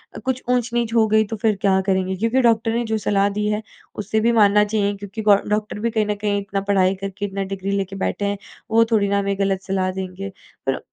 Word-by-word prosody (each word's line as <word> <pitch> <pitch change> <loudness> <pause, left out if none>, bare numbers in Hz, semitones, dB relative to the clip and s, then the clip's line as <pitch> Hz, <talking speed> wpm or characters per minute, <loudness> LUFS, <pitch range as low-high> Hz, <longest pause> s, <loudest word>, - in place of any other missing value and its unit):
अ, - - -6
कुछ 260 -1 -1
ऊँच-नीच 240 -2 0
हो 225 -2 +4
गई 220 - +5
तो - - 0
फिर 220 -2 +3
क्या 190 -1 +3
करेंगे? 190 0 +1
क्योंकि 230 +7 +1
डॉक्टर 230 -1 +2
ने 235 +1 0
जो - - +2
सलाह 200 0 +3
दी 210 - 0
है, 210 0 -1 0.4
उसे 220 +2 0
भी 235 - +4
मानना 210 -2 +5
चाहिए 205 -1 0
क्योंकि 205 +2 -7
गौ 210 -1 +6 0.2
डॉक्टर 210 0 -4
भी - - -2
कहीं 220 -2 +1
न 210 0 -1
कहीं 205 -1 +1
इतना 195 0 -3
पढ़ाई 190 -1 +3
करके 195 +1 -4
इतना 195 0 -3
डिग्री 195 +1 -4
लेके 195 0 -3
बैठे 205 - -2
हैं, 200 0 -1 0.3
वो 230 +1 +5
थोड़ी 210 -3 +3
ना 200 0 +2
हमें 200 0 -1
गलत 195 -1 +1
सलाह 190 -1 -1
देंगे।" 190 +1 -5 0.4
फिर 135 - 0
205 Hz, 235 wpm, -21 LUFS, 195-220 Hz, 0.4 s, गौ